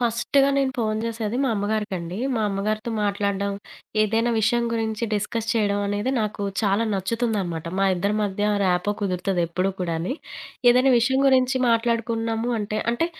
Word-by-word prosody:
ఫస్టుగా 240 Hz, +4 st, +2 dB
నేను 270 Hz, -1 st, +1 dB
ఫోను 220 Hz, -2 st, -1 dB
చేసేది 225 Hz, 0 st, -3 dB
మా 270 Hz, -, +1 dB
అమ్మగారికండి. 200 Hz, -4 st, -2 dB, 0.2 s
మా 225 Hz, -, 0 dB
అమ్మగారితో 215 Hz, +4 st, -2 dB
మాట్లాడడం, 200 Hz, -1 st, 0 dB, 0.5 s
ఏదైనా 225 Hz, +3 st, +1 dB
విషయం 235 Hz, +2 st, +2 dB
గురించి 225 Hz, -1 st, -1 dB
డిస్కస్ 215 Hz, +2 st, -2 dB
చేయడం 205 Hz, -3 st, +1 dB
అనేది 205 Hz, +5 st, -1 dB
నాకు 210 Hz, -1 st, -3 dB, 0.2 s
చాలా 200 Hz, +2 st, +2 dB
నచ్చుతుందనమాట. 195 Hz, -4 st, -2 dB
మా 195 Hz, -, +3 dB
ఇద్దరి 200 Hz, +4 st, 0 dB
మధ్య 205 Hz, 0 st, -1 dB, 0.2 s
ర్యాపో 180 Hz, +2 st, +1 dB
కుదురుతదెప్పుడ 180 Hz, -2 st, -1 dB
కూడాని. 170 Hz, +5 st, -2 dB, 0.6 s
ఏదైనా 255 Hz, +2 st, +4 dB
విషయం 265 Hz, +3 st, +2 dB
గురించి 260 Hz, -1 st, +3 dB
మాట్లాడుకున్నాము 230 Hz, 0 st, 0 dB
అంటే, 210 Hz, 0 st, -2 dB
అంటే 280 Hz, +8 st, 0 dB
215 Hz, 135 wpm, -24 LUFS, 200-235 Hz, 0.6 s, ఏదైనా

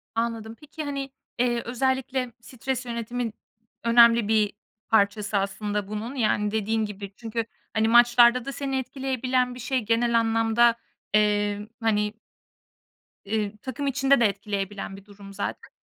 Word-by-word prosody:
Anladım. 230 Hz, -1 st, -2 dB
Peki, 305 Hz, +1 st, -8 dB
hani, 280 Hz, -2 st, -4 dB, 0.3 s
eee, 240 Hz, -1 st, +2 dB
özellikle 260 Hz, 0 st, -1 dB
stres 255 Hz, +2 st, -4 dB
yönetimin 235 Hz, -1 st, -3 dB, 0.5 s
önemli 235 Hz, -1 st, +6 dB
bir 215 Hz, -1 st, +2 dB, 0.4 s
parçası 210 Hz, -1 st, +2 dB
aslında 205 Hz, +1 st, -2 dB
bunun. 215 Hz, +5 st, -5 dB
Yani, 210 Hz, -4 st, +1 dB
dediğin 220 Hz, +1 st, 0 dB
gibi. 200 Hz, -1 st, -8 dB
Çünkü, 230 Hz, 0 st, -3 dB, 0.3 s
hani, 220 Hz, 0 st, +2 dB
maçlarda 240 Hz, +1 st, +6 dB
da 275 Hz, -, -3 dB
seni 270 Hz, 0 st, -2 dB
etkileyebilen 255 Hz, -1 st, -1 dB
bir -, -, -9 dB
şey. 260 Hz, +2 st, 0 dB
Genel 230 Hz, +1 st, +2 dB
anlamda, 225 Hz, +1 st, +3 dB, 0.4 s
eee, 205 Hz, 0 st, +2 dB
hani, 210 Hz, -2 st, +1 dB, 1.2 s
ııı, 210 Hz, -1 st, -1 dB
takım 265 Hz, +2 st, -4 dB
içinde 270 Hz, 0 st, +3 dB
de 235 Hz, -, +6 dB
etkileyebilen 200 Hz, -1 st, -3 dB
bir 195 Hz, -, -14 dB
durum 200 Hz, -1 st, -13 dB
zaten. 200 Hz, -, -5 dB
230 Hz, 135 wpm, -25 LUFS, 210-250 Hz, 1.2 s, önemli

